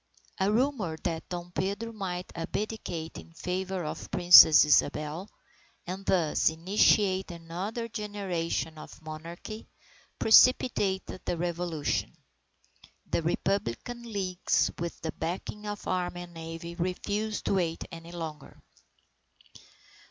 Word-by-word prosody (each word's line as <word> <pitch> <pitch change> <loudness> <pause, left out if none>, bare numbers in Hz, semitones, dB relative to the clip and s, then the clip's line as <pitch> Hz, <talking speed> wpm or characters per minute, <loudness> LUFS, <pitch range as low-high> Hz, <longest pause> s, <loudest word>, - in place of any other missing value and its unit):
A 190 +2 +2
rumor 225 - 0
that 165 -2 -3
Dom 175 0 -5
Pedro 200 +5 -2
might 180 -4 -4
abdicate 170 -2 -4
in 165 - -14
favour 185 +1 -3
of 155 - -6
Princess 175 -4 +9
Isabel, 150 +4 +1 0.6
and 185 +2 -5
thus 165 -5 +3
initiate 190 +3 +3
another 180 +7 -5
generation 190 -7 -3
of - - -11
monarchy, 165 +7 -8 0.5
precipitated 220 -6 +4
the 175 - -2
Revolution. 170 -2 -2 0.9
The - - +1
Republican 195 - -1
leagues, 185 -3 +1
with 170 0 -4
the 160 - -2
backing 185 +6 -5
of 205 0 -5
the - - -3
army 175 -1 -2
and 175 -1 -13
navy, 165 +1 -7
refused 205 +5 -2
to - - +1
wait 170 -4 0
any 165 0 -9
longer. 160 -4 -7
180 Hz, 115 wpm, -29 LUFS, 165-200 Hz, 0.9 s, Princess